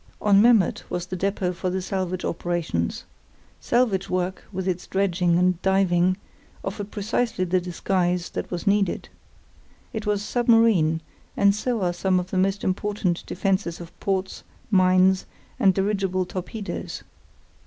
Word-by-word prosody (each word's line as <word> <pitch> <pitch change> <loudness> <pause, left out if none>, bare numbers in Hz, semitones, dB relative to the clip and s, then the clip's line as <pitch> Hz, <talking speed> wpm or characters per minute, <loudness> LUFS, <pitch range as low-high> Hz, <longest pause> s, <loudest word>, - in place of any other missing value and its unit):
On 200 -1 +5
Memmert 225 -6 +4
was 175 0 -3
the 185 - -5
depôt 190 -1 -1
for 185 +1 -3
the 185 +1 -1
salvage 185 -1 -3
operations. 165 - -2 0.6
Salvage 230 -6 +1
work, 185 0 -2
with 190 -1 -4
its 180 -1 -2
dredging 180 -3 +1
and 180 0 +2
diving, 185 -1 +2 0.5
offered 200 +1 -4
precisely 215 -1 -1
the 180 +1 +1
disguise 180 0 -1
that - - -4
was 175 +1 -4
needed. 200 -2 +1 0.8
It 220 -2 -4
was 205 -1 +1
submarine, 225 -10 +3 0.4
and 200 0 +5
so 220 0 -1
are 175 -1 +1
some 185 +1 +1
of 180 +1 -6
the 190 - -1
most 195 +1 +1
important 190 -2 -1
defences 190 -2 -1
of 170 -1 -9
ports, 190 -1 -2 0.3
mines, 185 0 +4 0.3
and 200 -6 +5
dirigible 195 -1 0
torpedoes. 195 +4 -6
190 Hz, 140 wpm, -24 LUFS, 180-200 Hz, 0.8 s, On